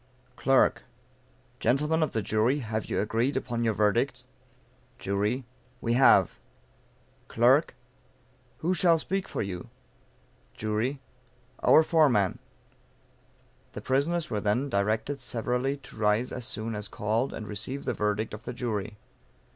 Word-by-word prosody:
Clerk. 135 -1 +3 0.8
Gentlemen 150 +5 +1
of 155 - +1
the 110 - -2
Jury, 115 +8 +1
have 110 -2 -3
you - - -1
agreed 115 +6 0
upon 120 -3 -2
your 110 -2 +1
verdict? 105 -2 +1 0.7
Jury. 105 +6 -1 0.3
We 115 -1 0
have. 130 +2 +5 0.9
Clerk. 125 +5 +3 0.9
Who 180 - +3
shall 175 -2 +4
speak 190 +4 -2
for - - -3
you? 90 -3 -6 0.9
Jury. 110 +6 -1 0.6
Our 160 - +6
foreman. 140 - +3 1.3
The - - -6
prisoners 155 +6 0
were 105 - -1
then 115 +7 0
directed 110 +6 0
severally 125 +2 -1
to 135 - -14
rise 105 +3 +1
as 125 - -4
soon 115 -2 -3
as 105 -1 -4
called, 110 +5 -1
and 110 - -7
receive 115 +7 -5
the - - 0
verdict 105 +1 -1
of 105 - -7
the - - -4
jury. 110 -4 -3
120 Hz, 130 wpm, -28 LUFS, 105-135 Hz, 1.3 s, Our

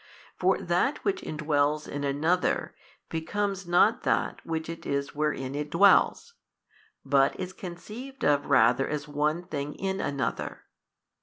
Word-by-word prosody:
For - - +2
that - - 0
which 390 -2 0
indwells 150 -1 0
in 145 0 -4
another, 155 +6 0 0.3
becomes 195 +3 -2
not 175 +6 +4
that - - 0
which 160 -1 -3
it 165 0 -7
is 140 0 -2
wherein 145 -3 -1
it 145 +1 -3
dwells; 200 - +4 0.7
but 135 0 +3
is 185 0 -4
conceived 230 +10 -7
of 145 -1 +2
rather 130 0 +4
as 150 -1 -3
one 150 +3 0
thing 150 -4 -5
in 190 0 -2
another. 140 -2 -3
155 Hz, 135 wpm, -28 LUFS, 145-185 Hz, 0.7 s, not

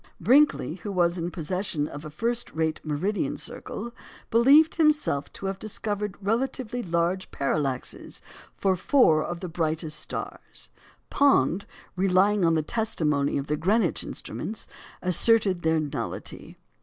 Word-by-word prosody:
Brinkley, 270 - +3
who 205 - -4
was 175 -1 +1
in 170 +1 -2
possession 175 -2 -2
of 145 0 -8
a 155 - -7
first 235 +10 -2
rate 160 -1 -1
meridian 160 +8 -1
circle, 235 0 -6 0.4
believed 275 +7 +6
himself 305 - +1
to - - -8
have 195 0 -3
discovered 210 -1 -3
relatively 245 +3 -1
large 175 0 -1
parallaxes 140 -2 -2 0.4
for 190 -1 +2
four 175 - +4
of 175 0 -5
the 185 - -4
brightest 160 -2 -2
stars; - - -7 0.4
Pond, 200 - +3 0.3
relying 195 +2 +3
on 165 -1 +4
the 155 - +1
testimony 150 -10 0
of 140 - -2
the 150 - -1
Greenwich 210 +9 +1
instruments, 220 - -5 0.4
asserted 190 0 +3
their 160 -1 +2
nullity. 145 -6 -5
185 Hz, 130 wpm, -26 LUFS, 155-220 Hz, 0.4 s, believed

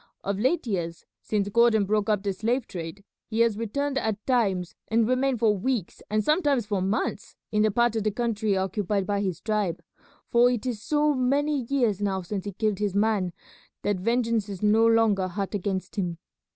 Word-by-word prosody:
Of 200 0 -2
late 260 +9 +1
years, 170 -6 -3 0.2
since 205 -2 -1
Gordon 225 -1 +4
broke 210 +1 0
up 205 -2 +1
the 200 -1 -1
slave 230 +6 -1
trade, 170 +2 -7 0.2
he 225 0 0
has 230 -2 +3
returned 270 +6 -1
at 220 -3 -3
times 195 -9 +1
and 225 0 +2
remained 255 +1 +1
for 215 -2 +3
weeks 215 -1 -2
and 215 +1 +1
sometimes 290 - +2
for 205 -2 -1
months 195 +4 -2 0.2
in 210 - +2
the 215 - +4
part 235 +2 +2
of 220 - 0
the 215 - +2
country 215 -2 0
occupied 195 +1 -1
by 200 0 0
his 185 -5 -2
tribe, 210 -5 -1 0.5
for 240 +1 +5
it 245 -1 -2
is 235 -5 -3
so 300 +3 +2
many 280 +1 +1
years 235 -8 +1
now 190 -2 -1
since 195 +2 -4
he 205 - -3
killed 210 0 -1
his 205 -2 -1
man 205 -3 +1 0.5
that 205 -2 0
vengeance 230 0 0
is 195 0 -6
no 220 +2 +5
longer 220 -4 +3
hot 195 +3 -4
against 195 0 -3
him. 175 -4 -1
215 Hz, 190 wpm, -26 LUFS, 195-235 Hz, 0.5 s, for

